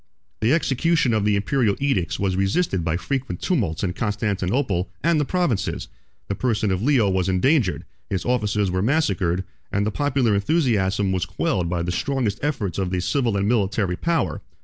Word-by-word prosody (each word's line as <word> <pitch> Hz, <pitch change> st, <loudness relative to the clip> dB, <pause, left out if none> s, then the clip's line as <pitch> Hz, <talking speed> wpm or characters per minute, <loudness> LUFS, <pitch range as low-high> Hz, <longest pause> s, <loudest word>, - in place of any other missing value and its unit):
21 110 Hz, -, +1 dB
The -, -, +6 dB
execution 160 Hz, -3 st, +1 dB
of 105 Hz, -2 st, +1 dB
the 105 Hz, -1 st, +3 dB
Imperial 105 Hz, 0 st, +1 dB
edicts 120 Hz, -, 0 dB
was 95 Hz, -2 st, 0 dB
resisted 95 Hz, -, +1 dB
by 80 Hz, +1 st, 0 dB
frequent 95 Hz, +1 st, -3 dB
tumults 105 Hz, -, -1 dB
in 90 Hz, -2 st, 0 dB
Constantinople 105 Hz, 0 st, -1 dB
and 165 Hz, 0 st, +3 dB
the -, -, 0 dB
provinces: 160 Hz, -, -1 dB, 0.4 s
the -, -, -1 dB
person 110 Hz, -2 st, 0 dB
of 95 Hz, 0 st, -1 dB
Leo 125 Hz, -4 st, +3 dB
was 95 Hz, -1 st, +1 dB
endangered, 105 Hz, -, +2 dB, 0.2 s
his 95 Hz, -3 st, -2 dB
officers 105 Hz, -5 st, +1 dB
were 90 Hz, 0 st, 0 dB
massacred, 95 Hz, -, +1 dB, 0.3 s
and 100 Hz, +1 st, +1 dB
the 110 Hz, -, 0 dB
popular 130 Hz, -2 st, +1 dB
enthusiasm 100 Hz, -, +1 dB
was 90 Hz, -1 st, -1 dB
quelled 95 Hz, -, -1 dB
by 85 Hz, -1 st, -1 dB
the 90 Hz, -, -2 dB
strongest 115 Hz, 0 st, -1 dB
efforts 110 Hz, -, -2 dB
of 95 Hz, -2 st, -1 dB
the 90 Hz, 0 st, -1 dB
civil 115 Hz, +2 st, 0 dB
and 100 Hz, 0 st, 0 dB
military 100 Hz, -4 st, +1 dB
power. 100 Hz, -, -1 dB
105 Hz, 175 wpm, -23 LUFS, 95-130 Hz, 0.4 s, The